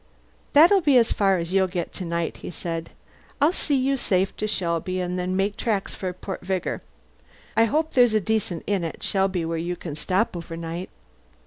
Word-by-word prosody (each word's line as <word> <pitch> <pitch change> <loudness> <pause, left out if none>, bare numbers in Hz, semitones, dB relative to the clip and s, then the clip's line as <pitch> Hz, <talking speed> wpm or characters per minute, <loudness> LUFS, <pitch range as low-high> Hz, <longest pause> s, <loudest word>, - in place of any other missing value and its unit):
"That'll 345 +7 +7
be 285 -5 +5
as 230 -2 +4
far 195 -2 +3
as 170 +1 -4
you'll 190 -1 +4
get 175 -1 -4
to 185 - -5
night," 170 -1 -2
he - - -7
said. 165 -1 -4 0.5
"I'll 295 +5 +4
see 295 -5 0
you 270 +1 +2
safe 190 -5 +1
to 215 - -1
Shelby, 185 -2 -1
and 180 0 -2
then 180 +1 -1
make 200 +2 +1
tracks 210 -4 -1
for 185 -2 -3
Port 185 +1 -6
Vigor. 185 -1 -2 0.7
I 225 +1 +5
hope 310 +6 0
there's 245 -3 +4
a - - +5
decent 205 -4 -1
inn 200 -4 0
at 165 - -5
Shelby 190 -3 +1
where 165 0 -2
you 175 +2 -2
can 165 -3 -7
stop 185 +7 0
overnight." 165 +1 -5
190 Hz, 195 wpm, -24 LUFS, 175-220 Hz, 0.7 s, That'll